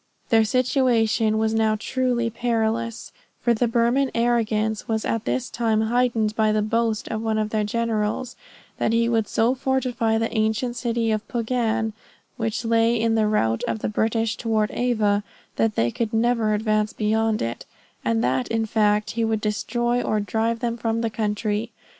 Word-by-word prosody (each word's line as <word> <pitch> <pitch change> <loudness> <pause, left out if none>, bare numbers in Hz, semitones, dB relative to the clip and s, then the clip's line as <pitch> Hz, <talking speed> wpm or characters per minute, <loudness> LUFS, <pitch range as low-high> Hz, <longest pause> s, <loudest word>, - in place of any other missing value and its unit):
Their 225 -1 +4
situation 230 -3 +2
was 220 0 +1
now 220 -1 +2
truly 245 -1 0
perilous, 230 -1 -1 0.3
for 240 - +2
the 235 +2 +1
Burman 240 +4 +2
arrogance 220 -2 0
was 220 -1 -1
at 225 -1 -1
this 255 -1 -1
time 225 -2 0
heightened 225 -2 +1
by 220 -1 +2
the 215 0 +1
boast 225 0 0
of 220 - -3
one 220 -1 0
of 215 0 -1
their 215 -1 +1
generals, 225 +2 -1 0.4
that 220 - +1
he 230 0 +3
would 225 -3 +1
so 230 +3 +2
fortify 255 -4 0
the 225 +1 -2
ancient 220 +3 0
city 235 -2 -1
of 215 0 -2
Pugan, 225 -2 -1 0.4
which 225 0 -2
lay 230 +1 +3
in 225 0 +1
the 220 -1 +2
route 115 - +1
of - - -1
the 220 - -3
British 225 +1 0
toward 220 -2 0
Ava, 215 -4 +1 0.3
that 225 -1 +1
they 115 +1 +1
could 225 - -3
never 225 -2 +2
advance 215 0 0
beyond 220 0 +1
it; 115 +1 -5 0.4
and 115 0 +1
that 130 +1 0
in 225 -1 0
fact 210 -1 +1
he 230 0 -1
would 220 -1 0
destroy 240 +3 -1
or 215 -3 0
drive 225 +3 -1
them 235 -1 -1
from 230 0 -1
the 230 -1 -1
country. 210 +1 -1
225 Hz, 170 wpm, -23 LUFS, 215-235 Hz, 0.4 s, Their